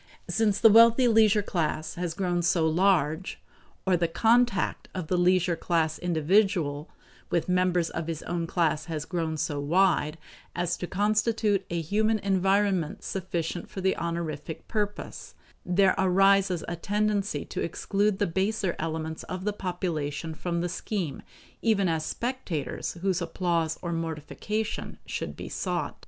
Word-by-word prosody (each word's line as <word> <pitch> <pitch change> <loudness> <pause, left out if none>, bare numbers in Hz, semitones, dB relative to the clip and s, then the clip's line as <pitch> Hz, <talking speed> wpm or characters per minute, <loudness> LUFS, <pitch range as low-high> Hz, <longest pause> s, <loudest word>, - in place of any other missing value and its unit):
Since 210 -3 +1
the 225 - +7
wealthy 230 +3 +7
leisure 220 -2 +4
class 155 -4 -2
has 175 -2 -3
grown 175 -2 0
so 170 -1 +2
large, 170 -1 +1 0.5
or 190 -1 +3
the 170 -1 +1
contact 225 +3 +2
of 180 -4 -4
the 185 - +2
leisure 180 -1 +3
class 160 -2 0
individual 170 -3 +1 0.4
with 170 - 0
members 180 -2 +1
of 165 - -4
his 165 -2 -4
own 170 -1 -2
class 160 -3 0
has 155 -3 -4
grown 165 -3 -2
so 145 -1 -2
wide, 165 0 +2 0.4
as 175 -1 0
to 180 - -5
constitute 210 0 +1
a 170 - -1
human 215 +7 +1
environment 195 -3 +1
sufficient 175 -2 -3
for - - -7
the 190 0 +1
honorific 165 -2 -4
purpose, 210 -2 -4 0.3
there 190 +1 +3
arises 190 -1 +3
a 170 - -3
tendency 205 +2 -1
to - - -5
exclude 205 0 0
the 205 - +1
baser 190 +1 -1
elements 160 0 -3
of 185 0 -5
the 210 - 0
population 165 -5 -3
from 170 +1 -2
the 175 - -1
scheme 180 -5 -3 0.4
even 210 -4 +2
as 160 -2 0
spectators 235 - -3
whose 190 -2 +1
applause 165 -1 -1
or 170 - -2
mortification 165 +7 -4
should - - -4
be - - -7
sought. - - -3
180 Hz, 145 wpm, -27 LUFS, 165-200 Hz, 0.5 s, the